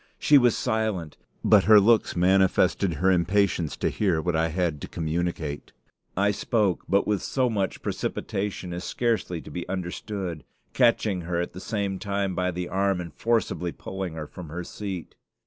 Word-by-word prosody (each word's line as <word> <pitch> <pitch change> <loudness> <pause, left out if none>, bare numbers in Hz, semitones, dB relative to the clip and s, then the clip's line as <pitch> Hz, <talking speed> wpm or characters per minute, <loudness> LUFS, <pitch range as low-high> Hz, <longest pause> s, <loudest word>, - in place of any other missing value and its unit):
She 145 -1 +6
was 120 -3 +3
silent, 110 -9 -1 0.3
but 105 -3 +5
her 110 -1 +8
looks 110 +2 +3
manifested 95 0 +3
her 95 +6 +3
impatience 90 -2 +1
to - - 0
hear 95 -7 +1
what 85 +1 -1
I 80 +1 +2
had 80 -3 -1
to - - -5
communicate. 80 -2 -3 0.4
I 100 +1 +3
spoke, 105 -4 0
but 100 +1 +3
with 105 -3 0
so 130 -3 0
much 100 -4 -2
precipitation 95 -2 -3
as 90 +1 -5
scarcely 115 -8 -1
to - - -11
be 90 0 -5
understood; 90 -2 -4 0.3
catching 115 -6 +2
her 85 0 -2
at 85 - -3
the 90 - -8
same 100 -2 -2
time 100 -2 -1
by 90 +1 0
the 90 0 -3
arm, 95 +1 +1
and 85 -3 -6
forcibly 115 -6 0
pulling 95 -3 -6
her 80 -1 -5
from 85 +1 -10
her 90 +3 -5
seat. 95 -2 -6
95 Hz, 170 wpm, -26 LUFS, 85-105 Hz, 0.4 s, her